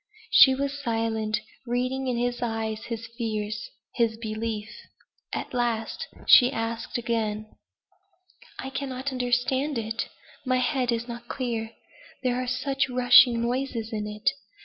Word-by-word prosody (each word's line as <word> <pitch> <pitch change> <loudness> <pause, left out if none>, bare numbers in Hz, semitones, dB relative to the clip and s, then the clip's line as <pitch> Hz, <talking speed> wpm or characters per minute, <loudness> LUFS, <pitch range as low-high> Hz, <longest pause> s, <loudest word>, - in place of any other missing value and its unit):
She 265 -1 +8
was 280 +1 -2
silent, 225 -3 -1 0.3
reading 255 +2 -1
in 250 -2 0
his 245 0 -1
eyes 225 -2 -2
his 230 -1 -5
fears 215 - -3 0.2
his 230 -2 +1
belief. 220 -1 -3 0.6
At - - -4
last 240 - -1 0.2
she 250 0 +8
asked 225 +1 -3
again. 220 -3 -1 1.1
"I 265 - -5
cannot 270 0 -3
understand 255 +3 0
it. 225 0 -2 0.4
My 255 -1 +2
head 250 0 +1
is 235 +1 -1
not 235 0 -7
clear. 230 -4 -3 0.5
There 250 0 +1
are 255 - -4
such 270 +2 0
rushing 245 -1 +6
noises 240 -2 -2
in 210 -1 -2
it. 210 0 -8
240 Hz, 130 wpm, -26 LUFS, 225-255 Hz, 1.1 s, She